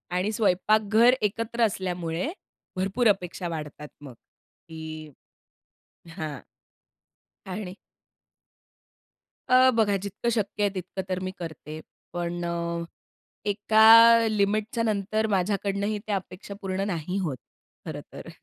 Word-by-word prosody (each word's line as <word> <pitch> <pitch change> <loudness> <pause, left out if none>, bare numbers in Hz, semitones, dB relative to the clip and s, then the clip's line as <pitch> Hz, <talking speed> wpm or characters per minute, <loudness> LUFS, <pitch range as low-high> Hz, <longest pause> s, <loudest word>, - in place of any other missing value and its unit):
आणि 190 +4 0
स्वयंपाकघर 215 +3 +3
एकत्र 230 +3 -2
असल्यामुळे 180 - -2 0.4
भरपूर 195 +6 +1
अपेक्षा 180 -2 0
वाढतात 150 -2 -6
मग, 135 -4 -10 0.5
की 155 -1 -8 1.1
हां, 150 -4 -4 1.1
आणि 185 -1 -5 1.8
अ, 255 +1 +7
बघा 205 -3 +3
जितकं 200 +4 -3
शक्य 210 -2 -1
आहे 205 - +3
तितकं 185 +1 -5
तर 185 0 -1
मी 185 0 -4
करते. 155 -2 -7 0.3
पण 175 0 -3
अ, 170 0 -2 0.7
एका 225 +2 +7
लिमिटच्यानंतर 215 0 0
माझ्याकडनंही 200 +1 0
त्या 205 - 0
अपेक्षा 190 +1 -7
पूर्ण 190 0 -2
नाही 180 +1 -3
होत, 150 -9 -2 0.5
खरं - - -5
तर. - - -9
195 Hz, 105 wpm, -26 LUFS, 175-215 Hz, 1.8 s, अ